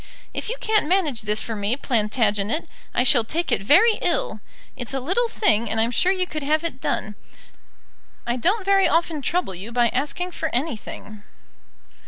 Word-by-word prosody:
If -, -, -4 dB
you -, -, -3 dB
can't 435 Hz, -7 st, +2 dB
manage 320 Hz, -, +1 dB
this 210 Hz, 0 st, 0 dB
for 225 Hz, -, -4 dB
me, 205 Hz, +3 st, -1 dB
Plantagenet, 215 Hz, 0 st, 0 dB, 0.2 s
I 245 Hz, -, +1 dB
shall 250 Hz, -2 st, +5 dB
take 335 Hz, +9 st, -3 dB
it -, -, +1 dB
very 390 Hz, -, +5 dB
ill. 275 Hz, -10 st, -1 dB, 0.4 s
It's 245 Hz, +2 st, -5 dB
a -, -, 0 dB
little 375 Hz, -, +1 dB
thing, 230 Hz, -, +1 dB
and 220 Hz, -, 0 dB
I'm 230 Hz, +2 st, +3 dB
sure 360 Hz, +9 st, +3 dB
you 370 Hz, -1 st, 0 dB
could 305 Hz, -3 st, -5 dB
have 305 Hz, +3 st, +1 dB
it 320 Hz, -6 st, -4 dB
done. 215 Hz, -, -2 dB, 1.1 s
I 240 Hz, -, -1 dB
don't 375 Hz, -, 0 dB
very 390 Hz, 0 st, +4 dB
often 330 Hz, -2 st, 0 dB
trouble 335 Hz, -, -1 dB
you 195 Hz, +6 st, -7 dB
by 240 Hz, 0 st, +2 dB
asking 300 Hz, +9 st, -2 dB
for 320 Hz, -2 st, -3 dB
anything." 225 Hz, -5 st, -5 dB
275 Hz, 180 wpm, -23 LUFS, 225-355 Hz, 1.1 s, shall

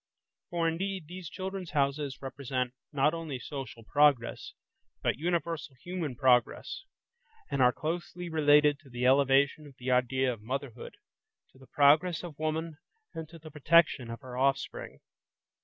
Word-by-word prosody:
For 170 Hz, -1 st, 0 dB
indeed, 185 Hz, +2 st, -2 dB
these 175 Hz, +1 st, -8 dB
"Children's 190 Hz, -1 st, -6 dB
Houses" 140 Hz, -2 st, -1 dB
represent 130 Hz, -2 st, -3 dB, 0.2 s
not 145 Hz, +1 st, +2 dB
only 165 Hz, -5 st, -4 dB
social 125 Hz, -3 st, -7 dB
progress, 145 Hz, -1 st, +2 dB, 0.5 s
but -, -, 0 dB
universal 165 Hz, -3 st, -2 dB
human 160 Hz, 0 st, -5 dB
progress, 130 Hz, -, +1 dB, 0.7 s
and 140 Hz, -, 0 dB
are 125 Hz, -1 st, +6 dB
closely 170 Hz, +4 st, -4 dB
related 150 Hz, -2 st, +4 dB
to 150 Hz, -4 st, -18 dB
the 120 Hz, 0 st, -3 dB
elevation 140 Hz, +2 st, +3 dB
of 140 Hz, -, -15 dB
the 130 Hz, +1 st, -3 dB
idea 125 Hz, +1 st, +2 dB
of 110 Hz, -, -12 dB
motherhood, 125 Hz, +1 st, -5 dB, 0.6 s
to 130 Hz, -, -21 dB
the 130 Hz, -, -16 dB
progress 155 Hz, +5 st, +4 dB
of 160 Hz, -5 st, -9 dB
woman 155 Hz, 0 st, -2 dB, 0.3 s
and 160 Hz, -1 st, -7 dB
to 170 Hz, -, -12 dB
the 155 Hz, -1 st, -12 dB
protection 150 Hz, -4 st, +3 dB
of 115 Hz, +2 st, -7 dB
her 130 Hz, -2 st, -9 dB
offspring. 135 Hz, +1 st, -1 dB
145 Hz, 145 wpm, -30 LUFS, 130-165 Hz, 0.7 s, are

